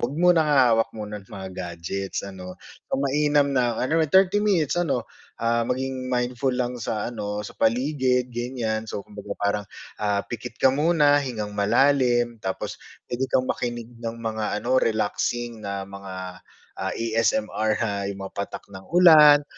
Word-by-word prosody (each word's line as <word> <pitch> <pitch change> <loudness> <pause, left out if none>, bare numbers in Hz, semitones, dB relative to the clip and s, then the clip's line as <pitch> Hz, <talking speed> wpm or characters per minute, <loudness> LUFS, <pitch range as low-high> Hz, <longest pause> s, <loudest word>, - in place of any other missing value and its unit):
'wag 120 +4 -2
munang 170 -2 +4
hahawak 125 -6 +4
muna 105 -1 -6
ng 95 - -21
mga 95 -1 -7
gadgets 90 +3 -4
ano, 90 -2 -8 0.4
mainam 145 +1 +2
na, 120 -3 +1
ano, 160 +6 +1
30 190 +4 +4
minutes, 190 -9 +2
ano 140 -8 0 0.3
ah, 115 0 0
maging 130 0 -2
mindful 125 +2 0
lang 125 -1 -2
sa 110 +1 -3
ano, 105 -1 -4
sa - - -10
paligid 125 0 +1
ganyan. 115 -2 -3
So 100 - -5
kumbaga 100 -1 -7
parang, 100 0 0 0.4
ah, 100 -1 0
pikit 115 0 -7
ka 130 - +4
muna, 150 -1 +4
hingang 110 -6 -4
malalim, 120 +2 +2
tapos 95 0 -4 0.3
pwede 130 +2 -1
kang 130 - +2
makinig 120 -1 -3
ng 115 -1 -4
mga 110 -2 -2
ano, 130 +3 +2
relaxing 115 +1 -1
na 100 -1 -4
mga, 95 -2 -8 0.4
ah, - - -1
ASMR, 115 - 0
na 110 - -1 0.2
'yung 100 - -5
mga - - -8
patak 100 - -5
ng 95 0 -10
ulan 150 -4 +8
120 Hz, 155 wpm, -24 LUFS, 105-135 Hz, 0.4 s, ulan